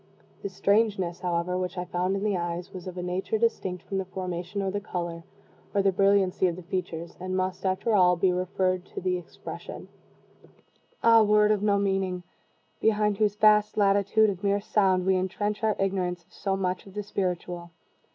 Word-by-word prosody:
The 200 - -3
"strangeness," 195 -2 +1
however, 180 0 -1
which 180 0 -3
I 180 - -2
found 180 +2 -1
in 195 - -3
the 210 -2 +1
eyes 175 +1 -4
was 185 -1 -8
of 185 0 -7
a 180 - -3
nature 185 +4 -1
distinct 200 -5 -1
from 195 - -3
the 190 - -3
formation, 185 +1 -4
or 190 - -1
the 205 - -2
color, 170 -4 -5 0.5
or 200 - +3
the 195 - +4
brilliancy 195 -1 +3
of 170 - -1
the 180 - -9
features, 170 -2 -4
and 185 +1 -3
must, 185 +1 -1
after 190 +4 0
all, 180 -3 +5
be 185 +1 +2
referred 185 0 0
to - - -2
the 180 0 0
expression. 175 - -9 1.1
Ah, 230 -1 +7
word 210 0 +4
of 210 -2 +1
no 205 -1 +3
meaning! 190 -2 0 0.6
behind 210 -2 +2
whose 210 -2 +2
vast 210 0 +4
latitude 200 +1 +3
of 190 +1 -8
mere 200 0 +2
sound 190 -3 +2
we 190 0 +3
intrench 205 +3 -1
our 215 -1 +2
ignorance 185 -3 -1
of - - -30
so 195 -1 -2
much 185 0 -2
of 195 - -14
the 210 - -3
spiritual. 180 -3 -3
190 Hz, 190 wpm, -27 LUFS, 180-205 Hz, 1.1 s, Ah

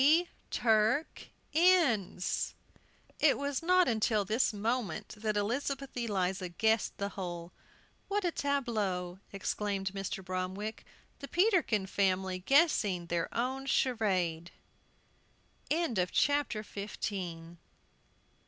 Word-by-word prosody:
"P 320 +6 +5 0.2
Turk 225 +6 +1 0.3
Inns!" 305 - +2 0.6
It - - +4
was 280 -1 -2
not 365 +2 +4
until 220 -3 +2
this 220 +6 +2
moment 215 0 -2
that 215 0 -2
Elizabeth 270 +6 -2
Eliza 190 -6 -1
guessed 220 +5 +1
the 200 0 -2
whole. 175 -3 -6 0.6
"What 405 -1 0
a 350 - +2
tableau!" 215 - -1
exclaimed 195 -1 -2
Mr. 195 -1 -4
Bromwick; 185 +4 -4 0.3
"the 280 - -7
Peterkin 345 - +2
family 190 -1 0
guessing 210 - +3
their 170 0 -2
own 260 +3 -1
charade." 185 -11 +1
215 Hz, 90 wpm, -32 LUFS, 190-270 Hz, 0.6 s, P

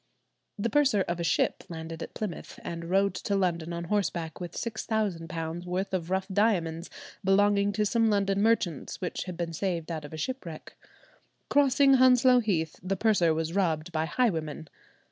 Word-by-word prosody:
The 220 +2 -1
purser 275 -9 +3
of 175 -1 -3
a - - -1
ship 160 - +1
landed 160 -1 -7
at - - -7
Plymouth 205 -6 -6
and 170 0 -5
rode 195 +1 +3
to 200 - -2
London 170 -3 0
on 170 0 -4
horseback, 170 -4 -2
with 175 - -6
£6,000 175 -7 -3
worth 185 +2 -2
of 175 -2 -2
rough 190 0 0
diamonds 185 -5 0 0.3
belonging 200 +1 +3
to 210 +1 +1
some 225 +1 +2
London 200 -1 +1
merchants 205 - 0
which 180 - -3
had 180 -2 -6
been 170 -1 -3
saved 170 -2 -2
out 160 -2 -4
of 145 - -9
a 160 - -7
shipwreck. 170 - -6 0.8
Crossing 275 -1 +5
Hounslow 255 0 +6
Heath, 170 -9 -1
the 190 +2 -2
purser 195 -6 +3
was 160 +1 -1
robbed 170 -4 0
by 160 -1 0
highwaymen. 160 - -1
185 Hz, 165 wpm, -28 LUFS, 165-210 Hz, 0.8 s, Hounslow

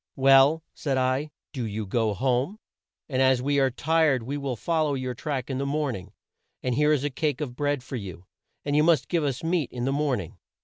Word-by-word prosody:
'Well,' 135 +4 +5
said 135 -3 -2
I, 130 +3 0 0.2
'do 130 - -3
you 110 -1 -3
go 110 +1 0
home; 130 - 0 0.5
and 130 -3 0
as 130 -1 +4
we 140 +2 +1
are 135 -1 +3
tired 150 -1 +2
we 135 +5 -4
will 140 -3 -3
fol 160 - 0
low 145 - 0
your 130 -1 -3
track 135 -1 -3
in 130 -1 -3
the 140 - -1
morn 145 -2 -1
ing, 95 +1 -10 0.5
and 125 - 0
here 150 +4 +3
is 145 -3 +2
a 145 - -1
cake 150 0 -1
of 135 -5 -4
bread 145 -1 -1
for 130 - -5
you, 95 -4 -8 0.4
and 145 0 0
you 150 - +5
must 155 -4 +3
give 170 -3 +1
us 135 -1 -2
meat 165 -4 0
in 120 -1 -3
the 135 - 0
morn 140 -4 +1
ing.' 85 - -11
135 Hz, 230 wpm, -26 LUFS, 125-150 Hz, 0.5 s, Well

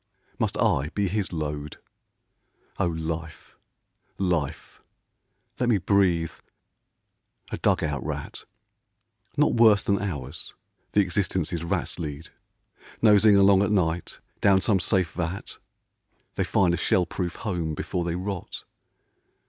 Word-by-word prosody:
Must - - 0
I 70 +3 +2
be 100 -1 +1
his 100 0 -2
load? 75 -2 -4 1.0
O 100 - +2
Life, 80 -1 -5 0.6
Life, 80 -6 -2 0.8
let 125 -1 +1
me 110 - +4
breathe, 90 -4 +2 0.6
— - - -31
a - - -4
dug - - +2
out 75 -3 -2
rat! - - -5 0.9
Not 150 - +3
worse 110 -4 +5
than 100 0 +1
ours 75 -9 -5 0.4
the 105 - +5
existences 90 -3 -1
rats 85 - -2
lead 75 -1 -6 0.4
— - - -23
Nosing 105 -1 +6
along 100 -1 +6
at 100 - +1
night 85 -5 0 0.2
down 100 -1 +5
some 100 0 +2
safe 90 -2 +1
vat, 85 +2 -5 0.7
They - - -1
find 90 -3 +2
a - - 0
shell 90 +2 +2
proof 90 0 -4
home 85 -7 -3
before 90 +3 -3
they 85 0 -2
rot. 95 0 -5
90 Hz, 130 wpm, -26 LUFS, 80-100 Hz, 1.0 s, Nosing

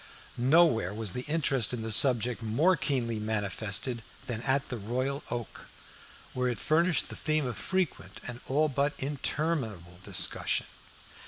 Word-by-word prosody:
Nowhere 125 - +3
was 110 -4 0
the 125 - -3
interest 135 -7 +1
in 115 - -5
the 110 - -3
subject 120 0 +5
more 140 +12 +3
keenly 125 -6 -1
manifested 110 +2 -1 0.2
than 115 -2 -3
at 135 +1 0
the 125 - -3
Royal 130 +7 -2
Oak, 120 -2 -6 0.7
where 125 0 0
it 120 - -2
furnished 165 - +2
the - - -7
theme 155 -2 0
of 125 -3 -3
frequent 185 - -2
and 120 -1 -6
all 150 +4 +2
but 140 +1 0
interminable 130 - -3
discussion. - - +1
125 Hz, 145 wpm, -29 LUFS, 110-145 Hz, 0.7 s, subject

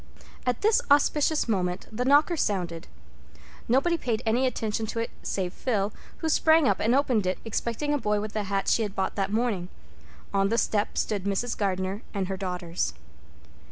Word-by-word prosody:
At 250 -2 0
this 435 +1 +4
auspicious 295 +1 +3
moment 180 -4 -1
the 230 +3 -2
knocker 290 +6 +5
sounded. 180 - -2 0.8
Nobody 325 +8 +2
paid 235 -3 -1
any 240 +4 +2
attention 220 -2 -2
to 230 - -5
it 230 - -2
save 185 -2 -2
Phil, 210 -5 -1 0.2
who 320 - -3
sprang 315 -1 +4
up - - +2
and 230 +4 +2
opened 245 -8 +2
it, 185 - 0
expecting 235 +6 -1
a 290 - +1
boy 210 -3 +1
with 210 0 -5
the 215 -1 -2
hat 195 0 -1
she - - +3
had 210 -2 -3
bought 190 - -1
that 195 -1 -1
morning. 215 -6 0 0.6
On 195 0 +3
the 215 - -1
doorstep 215 -2 0
stood 200 -3 -1
Mrs. 200 +5 -1
Gardner 190 0 -1
and 195 -1 -1
her 190 - -2
daughters. 180 - -3
215 Hz, 180 wpm, -27 LUFS, 195-250 Hz, 0.8 s, knocker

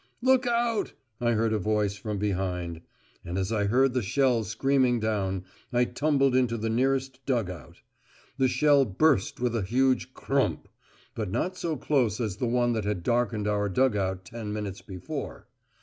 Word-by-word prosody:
"Look 260 -1 +4
out!" 235 -2 0 0.3
I 120 -1 +2
heard 110 0 +1
a 110 - +1
voice 105 0 0
from 105 +1 -4
behind. 90 -4 -2 0.4
And 85 +2 -4
as 95 +2 -1
I 105 -2 +1
heard 125 +5 +3
the 125 - +1
shell 125 +1 +2
screaming 125 +3 +1
down, 100 -4 -1 0.3
I 125 0 +3
tumbled 135 +1 +1
into 125 -2 +2
the 110 0 -2
nearest 130 +2 0
dug 115 -8 0
out. 85 - -12 0.6
The 130 - +4
shell 145 +1 +4
burst 125 +1 +1
with 120 -1 0
a 115 - 0
huge 130 +5 +1
"crump," 135 0 -1 0.5
but 105 -4 -3
not 150 - -1
so 165 -4 -3
close 125 -6 +1
as 105 -5 -2
the 125 - -1
one 120 0 +2
that 110 -2 -1
had 100 -4 -2
darkened 115 -2 0
our 105 -1 0
dug 130 +3 +2
out 95 -2 -2
ten 110 +2 -6
minutes 105 -2 -4
before. 95 -3 -7
115 Hz, 175 wpm, -27 LUFS, 105-130 Hz, 0.6 s, Look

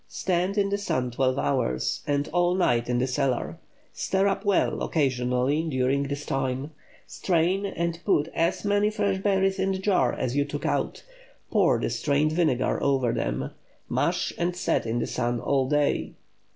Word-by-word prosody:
Stand 185 +2 -1
in 200 -1 +2
the 200 - 0
sun 130 -10 -1
twelve 130 +1 +1
hours, 65 -3 0
and 145 0 0
all 175 +1 +2
night 120 -10 +1
in 125 - +1
the 125 - +1
cellar. 130 -1 -1 0.3
Stir 195 +1 +1
up 195 - -1
well 200 -2 +1
occasionally 130 0 +1
during 135 +1 +1
this 145 +1 -4
time. 135 +2 -2 0.3
Strain, 185 +3 0
and 170 -3 -2
put 155 -7 +2
as 175 +4 0
many 205 +1 +2
fresh 205 -3 0
berries 195 -1 +1
in 190 0 +1
the - - -2
jar 190 -10 +2
as 125 +1 -2
you 145 - +3
took 145 +1 -5
out; - - -1 0.5
pour - - +3
the - - -2
strained 150 +1 +1
vinegar 155 -7 +1
over 130 -4 +1
them; 65 +3 -2 0.4
mash - - 0
and 175 +1 0
set 180 - 0
in 115 +2 -1
the 120 - 0
sun 120 0 -1
all 135 0 0
day. 150 -1 0
145 Hz, 170 wpm, -26 LUFS, 130-190 Hz, 0.5 s, you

